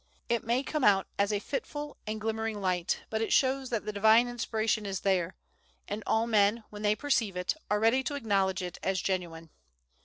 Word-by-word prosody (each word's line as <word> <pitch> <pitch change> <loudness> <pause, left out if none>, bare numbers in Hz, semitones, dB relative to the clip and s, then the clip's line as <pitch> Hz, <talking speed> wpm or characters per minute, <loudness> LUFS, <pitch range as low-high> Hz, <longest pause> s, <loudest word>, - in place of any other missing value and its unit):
It 235 -1 +1
may 240 +4 +1
come 300 +1 -2
out 195 -3 +5
as 200 +1 +2
a 205 - +1
fitful 290 +6 -5
and 215 0 -3
glimmering 220 0 -2
light, 180 -3 0
but 220 0 -1
it 225 - -1
shows 265 -1 +2
that 230 -3 -2
the 215 - -3
Divine 220 +4 +5
inspiration 220 -3 -1
is 195 -1 -3
there, 185 -3 +1 0.5
and 205 +2 -4
all 220 +1 +2
men, 215 0 +3
when 210 0 -8
they 210 0 +2
perceive 230 -8 0
it, 180 0 0 0.2
are 210 - +2
ready 225 +4 +3
to 290 - -2
acknowledge 195 -6 0
it 180 -1 -6
as 190 -1 0
genuine. 165 -4 -3
215 Hz, 195 wpm, -30 LUFS, 195-235 Hz, 0.5 s, out